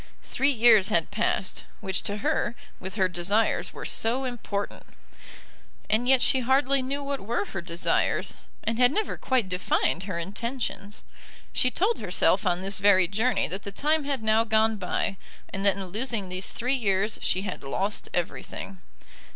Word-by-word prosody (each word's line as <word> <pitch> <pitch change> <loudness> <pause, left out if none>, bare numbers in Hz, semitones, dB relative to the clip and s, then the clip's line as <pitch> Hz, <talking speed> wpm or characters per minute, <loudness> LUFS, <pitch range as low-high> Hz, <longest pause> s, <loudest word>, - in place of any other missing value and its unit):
Three 275 - +1
years 225 -6 +5
had 165 -2 +1
passed, 210 -3 -1
which 190 -3 0
to 205 - -2
her, 300 -6 0 0.2
with 190 +1 -7
her 190 -3 +2
desires, 185 +5 0
were - - -8
so 240 +4 +2
important. 225 -5 -4 1.1
And 230 +3 +2
yet 260 -1 +5
she 260 - +4
hardly 265 +2 +3
knew 275 +2 -3
what 280 -1 -3
were 205 0 -2
her 190 - -6
desires, 170 0 0 0.3
and 225 +1 -2
had 250 0 +5
never 430 +7 -1
quite 255 -6 0
defined 180 -1 0
her 185 -4 -4
intentions. 205 +3 -5 0.5
She 255 - +3
told 405 - 0
herself - - +2
on 180 +1 +1
this 195 0 -1
very 190 -3 +5
journey 220 +7 +1
that 190 +2 -4
the 200 - -7
time 300 +7 0
had 275 -5 -2
now 220 +1 +3
gone 220 0 +2
by, 195 +1 -2 0.4
and 195 - -3
that 195 - +4
in 195 - -2
losing 215 0 -2
these 185 +1 -1
three 250 +3 -1
years 205 -3 0
she 185 - 0
had 190 -3 -5
lost 195 +9 -2
everything. 180 +2 -5
215 Hz, 165 wpm, -26 LUFS, 190-250 Hz, 1.1 s, years